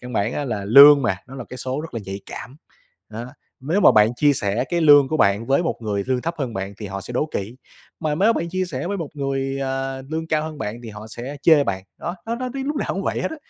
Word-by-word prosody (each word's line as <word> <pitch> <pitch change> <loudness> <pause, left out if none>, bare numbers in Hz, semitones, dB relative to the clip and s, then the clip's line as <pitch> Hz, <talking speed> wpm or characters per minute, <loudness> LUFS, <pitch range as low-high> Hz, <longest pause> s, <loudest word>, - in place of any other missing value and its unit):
căn 125 0 -9
bản 110 +2 0
á 145 - -2
là 110 -6 -3
lương 140 +6 +9
mà, 115 -6 +1
nó 135 - -10
là 130 - -6
cái 130 - -8
số 130 +3 -3
rất 160 -3 -9
là 115 - -3
nhạy 95 +1 -6
cảm. 130 +4 -9 0.5
Nó, 115 +3 -7 0.3
nếu 160 +10 0
mà - - +7
bạn 110 +3 +4
chia 145 +2 +4
sẻ 105 0 -1
cái 175 -1 0
lương 145 -3 +7
của 155 - 0
bạn 100 -4 +2
với 140 +6 +2
một 165 - -1
người 100 -2 -2
lương 130 -1 0
thấp 170 +1 -2
hơn 130 -6 -3
bạn 95 +1 -4
thì 105 - -5
họ 100 0 -5
sẽ 120 - -9
đố 150 +5 +1
kỵ. 105 +6 -4 0.4
Mà 155 -2 0
mếu 205 +8 +3
mà - - -5
bạn 170 +1 -2
chia 185 +1 -1
sẻ 145 -4 -5
với 200 +2 -2
một 165 -6 -5
người, 135 -1 -2
à, 135 0 -3
lương 160 +1 -3
cao 155 -1 0
hơn 155 -1 -6
bạn 110 +3 -5
thì 115 - -8
họ 105 +1 -9
sẽ 125 +6 -7
chê 155 -4 +6
bạn. 95 -3 -3 0.2
Nó, 175 +2 -4
nó 230 - -1
nói 255 +1 -3
tí 270 - -3
lúc 295 +1 -2
nào - - -1
cũng - - -3
vậy - - -2
hết - - -2
á. 320 - -6
135 Hz, 290 wpm, -22 LUFS, 115-155 Hz, 0.5 s, lương